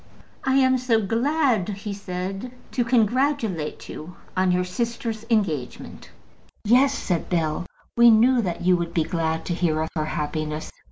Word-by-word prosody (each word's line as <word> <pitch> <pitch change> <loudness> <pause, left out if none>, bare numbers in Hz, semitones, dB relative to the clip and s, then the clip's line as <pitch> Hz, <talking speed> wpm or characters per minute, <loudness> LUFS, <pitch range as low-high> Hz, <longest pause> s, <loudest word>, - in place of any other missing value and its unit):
"I 265 0 +1
am 260 -1 +4
so 240 -3 +2
glad," 230 - +1
he 200 0 -5
said, 195 +4 -5 0.2
"to 245 - +1
congratulate 235 - 0
you 175 +4 -9 0.2
on 185 0 +2
your 180 0 +2
sister's 225 +3 -3
engagement." 170 - -2 0.6
"Yes," 265 +5 +4
said 175 -4 -2
Bell; 165 0 -1 0.3
"we 235 0 +7
knew 235 +3 +5
that 180 -5 -3
you 180 0 +4
would 170 -1 -4
be 165 - +3
glad 160 0 -2
to 175 - -2
hear 165 -3 0
of 160 0 -1
her 155 -1 0
happiness." 155 0 -3
195 Hz, 155 wpm, -24 LUFS, 170-235 Hz, 0.6 s, we